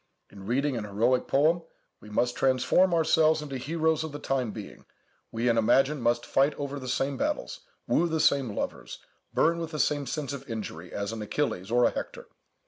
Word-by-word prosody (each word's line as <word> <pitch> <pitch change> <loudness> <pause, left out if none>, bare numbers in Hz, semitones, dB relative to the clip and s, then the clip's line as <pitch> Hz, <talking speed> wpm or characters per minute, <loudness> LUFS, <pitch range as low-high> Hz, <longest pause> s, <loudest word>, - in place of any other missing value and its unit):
In 100 -1 -11
reading 135 +3 +1
an 115 - -3
heroic 115 +5 +1
poem 155 +5 +3 0.4
we 105 - -13
must 120 +3 0
transform 135 +8 +3
ourselves 160 -1 +3
into 140 -3 -5
heroes 160 +3 0
of 160 - -5
the 145 - -6
time 135 -4 -1
being, 105 -1 -9 0.4
we 115 +2 -1
in 115 -1 +3
imagination 135 +5 +3
must 120 0 +1
fight 140 +2 +2
over 145 0 -4
the 130 - -8
same 135 +2 -1
battles, - - -2 0.3
woo 175 - +2
the 160 0 0
same 135 -8 +2
loves, - - -4 0.3
burn 170 +1 +2
with 165 -1 -4
the 155 -2 -5
same 145 -2 +1
sense 145 0 -3
of 140 0 -8
injury, 95 -6 -6
as 100 +1 -3
an 115 -1 -5
Achilles 105 -4 -2
or 120 +1 +4
a - - +3
Hector. - - -6
135 Hz, 195 wpm, -28 LUFS, 115-150 Hz, 0.4 s, or